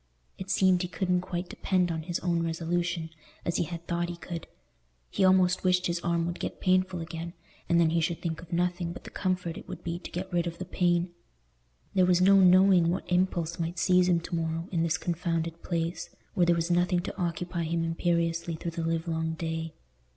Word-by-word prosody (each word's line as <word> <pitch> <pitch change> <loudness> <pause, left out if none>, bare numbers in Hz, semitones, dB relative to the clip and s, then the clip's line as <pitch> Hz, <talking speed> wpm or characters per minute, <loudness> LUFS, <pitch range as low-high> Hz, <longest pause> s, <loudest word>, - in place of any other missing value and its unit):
It 190 0 -6
seemed 185 -2 +4
he 180 - -2
couldn't 180 +1 0
quite 180 -1 -4
depend 180 -2 0
on 160 -1 -2
his 170 +1 -3
own 170 -2 +1
resolution, 165 0 -1 0.3
as 170 - 0
he 175 - +1
had 170 +1 -7
thought 175 0 -1
he 175 - -5
could; 170 -1 -7 0.6
he - - +1
almost 185 -1 +4
wished 180 -1 +3
his 170 0 0
arm 170 -1 0
would 175 +1 -4
get - - -4
painful 185 -1 +2
again, 165 +1 -6 0.4
and 170 - +4
then 165 -2 +4
he 165 0 +2
should 165 +1 -1
think 165 -2 -3
of 170 0 -14
nothing 175 0 0
but - - -10
the - - -10
comfort 180 -3 -2
it - - -14
would - - -8
be 170 0 -3
to - - -8
get 185 +1 -5
rid 175 0 +1
of 170 - -5
the 185 - -5
pain. 175 -1 +1 0.8
There 185 -2 +4
was 180 -1 +4
no 195 +2 +6
knowing 185 -2 +6
what 180 +1 -3
impulse 175 -2 +1
might 170 +1 -2
seize 180 +2 +4
him 170 -1 +3
to 170 - -8
morrow, 165 +1 -2
in 170 -3 +1
this 165 -1 +1
confounded 165 0 -2
place, 170 0 -2 0.2
where 175 -1 +3
there 170 - +5
was 170 +1 -1
nothing 175 +1 +2
to - - -6
occupy 175 0 -2
him 165 +1 0
imperiously 170 0 0
through 170 +1 -4
the 165 0 -4
livelong 160 0 -1
day. 160 0 -4
170 Hz, 210 wpm, -28 LUFS, 165-180 Hz, 0.8 s, no